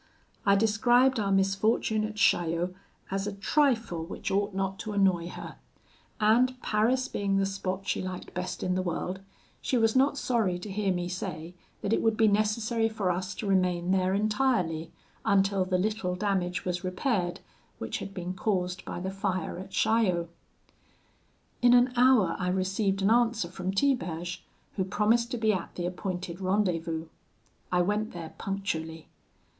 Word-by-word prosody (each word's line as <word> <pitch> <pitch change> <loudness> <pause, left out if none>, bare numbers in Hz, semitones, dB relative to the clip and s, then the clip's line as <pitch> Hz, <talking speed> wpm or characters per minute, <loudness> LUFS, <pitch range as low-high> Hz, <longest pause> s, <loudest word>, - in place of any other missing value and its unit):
I 200 - +6
described 240 +4 +3
our 200 -2 0
misfortune 195 +3 +2
at 215 0 -6
Chaillot 175 -3 +2 0.4
as 195 +1 -1
a 205 - -3
trifle 225 - +1
which 195 +4 -5
ought 200 +2 +1
not 195 0 -2
to 215 -2 -5
annoy 185 -4 +2
her; - - -8 0.6
and 245 +4 +3
Paris 240 +5 +2
being 200 -1 -1
the 195 - +2
spot 195 0 -3
she - - -1
liked 185 -1 -6
best 180 0 -4
in 180 - 0
the 185 - 0
world, 180 +1 -3 0.4
she 255 - 0
was 225 0 +2
not 275 +2 +3
sorry 225 -9 +1
to 195 +3 -7
hear 200 0 0
me 175 -1 -1
say 170 -2 -5 0.3
that 200 - 0
it - - +2
would 225 -1 +2
be 225 -1 +5
necessary 215 +2 +1
for 205 -4 -1
us 185 +2 -3
to - - -5
remain 180 -2 +1
there 190 0 +2
entirely, 210 -7 0 0.3
until 195 -1 +2
the 185 0 +1
little 200 -2 -1
damage 185 -3 -1
was 180 0 -2
repaired 185 -1 -1 0.4
which - - -4
had - - -6
been 180 -1 -5
caused 180 -2 -1
by - - -5
the 190 +1 -3
fire 190 -3 -2
at 190 - -8
Chaillot. 190 -4 +1 1.3
"In 245 0 +6
an 245 +1 +4
hour 245 -8 +4
I 180 - -1
received 195 +2 0
an 200 - +4
answer 230 -6 +2
from 185 +1 -3
Tiberge, 180 -7 -1 0.3
who 190 - +2
promised 220 +5 +2
to 245 - -3
be 220 -2 +2
at 185 -3 -4
the 175 - -3
appointed 180 0 -4
rendezvous. 175 -4 0 0.7
I 180 -1 +3
went 210 +3 -1
there 165 -2 -7
punctually. 165 -5 -4
195 Hz, 165 wpm, -28 LUFS, 180-215 Hz, 1.3 s, I